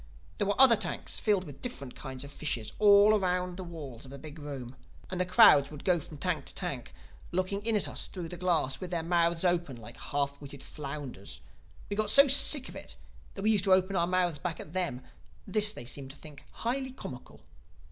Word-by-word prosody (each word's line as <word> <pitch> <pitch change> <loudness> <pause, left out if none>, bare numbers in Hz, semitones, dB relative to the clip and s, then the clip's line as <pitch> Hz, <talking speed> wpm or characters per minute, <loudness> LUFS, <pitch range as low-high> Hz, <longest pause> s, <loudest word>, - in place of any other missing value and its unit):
There 205 - +1
were 205 - -1
other 260 -3 +9
tanks - - -2
filled 205 -4 +2
with 145 -6 -11
different 140 - -6
kinds 130 -2 -7
of 140 - -10
fishes 130 -7 -3
all 205 0 +7
round 180 -1 -1
the 185 - -6
walls 150 -9 -9
of 135 - -11
the 140 - -9
big 155 +3 -10
room. 135 -4 -7 0.4
And 185 -1 -1
the 180 - -1
crowds 140 -6 +7
would 150 -2 -10
go 180 -2 +2
from 150 0 -10
tank 155 -2 -2
to - - -5
tank, 140 -10 -4 0.4
looking 185 +3 -1
in 225 0 +2
at 205 - +1
us - - -1
through 175 -3 -7
the 175 - -6
glass—with 175 -1 -1
their 170 -2 -2
mouths 170 0 +1
open, 175 -6 +1
like 110 -2 -11
half 140 0 -3
witted 140 -1 -9
flounders. 140 -8 -7 0.5
We 205 - -3
got 215 0 0
so 280 +6 +7
sick 275 0 +5
of - - -10
it - - -8 0.4
that 195 - -6
we 215 - +4
used 205 -2 +3
to 190 - +5
open 185 +1 +2
our 170 -1 +2
mouths 180 -4 0
back 165 +1 -4
at 150 - -9
them; 175 -9 -2 0.4
and 195 - -11
this 210 -1 +3
they 165 - -8
seemed 135 +2 -5
to 135 - -12
think 150 -2 -12
highly 260 +3 -2
comical. 125 - -10
175 Hz, 220 wpm, -30 LUFS, 140-195 Hz, 0.5 s, other